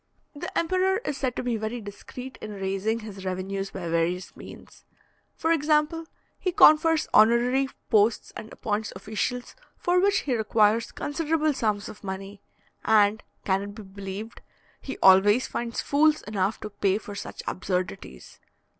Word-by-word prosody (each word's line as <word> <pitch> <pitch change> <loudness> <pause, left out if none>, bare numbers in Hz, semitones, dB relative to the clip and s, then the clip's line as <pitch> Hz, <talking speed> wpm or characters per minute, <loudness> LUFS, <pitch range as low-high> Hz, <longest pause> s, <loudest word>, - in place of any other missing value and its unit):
The 315 +5 -6
emperor 370 +3 +2
is 295 - -2
said 260 -3 -2
to - - -3
be 245 -2 -1
very 220 +3 -4
discreet 240 +5 -9
in 215 - -6
raising 195 +3 -2
his 200 -3 -9
revenues 190 +1 -3
by 185 -3 -6
various 170 +2 -1
means. - - -13 0.5
For 325 - 0
example, 305 +1 +2 0.3
he 365 - -1
confers 325 -3 +5
honorary 240 +5 +4 0.2
posts 215 +1 +2
and 220 - -8
appoints 215 0 -3
officials, 220 +5 -3 0.2
for 355 +1 +2
which 400 +2 +3
he 260 -4 -1
requires 220 +1 +2
considerable 310 0 0
sums 210 -5 -1
of 210 - -11
money; 195 +1 -6 0.4
and 215 -1 +4 0.2
can 190 0 +1
it 205 0 -7
be 215 - -9
believed! 195 +2 -8 0.4
he 270 - -6
always 205 +6 +6
finds 235 -1 -3
fools 305 +2 +3
enough 205 0 -1
to 210 - -6
pay 195 -1 +1
for 210 -1 -8
such 200 - -7
absurdities. 180 - -4
220 Hz, 150 wpm, -26 LUFS, 195-280 Hz, 0.5 s, always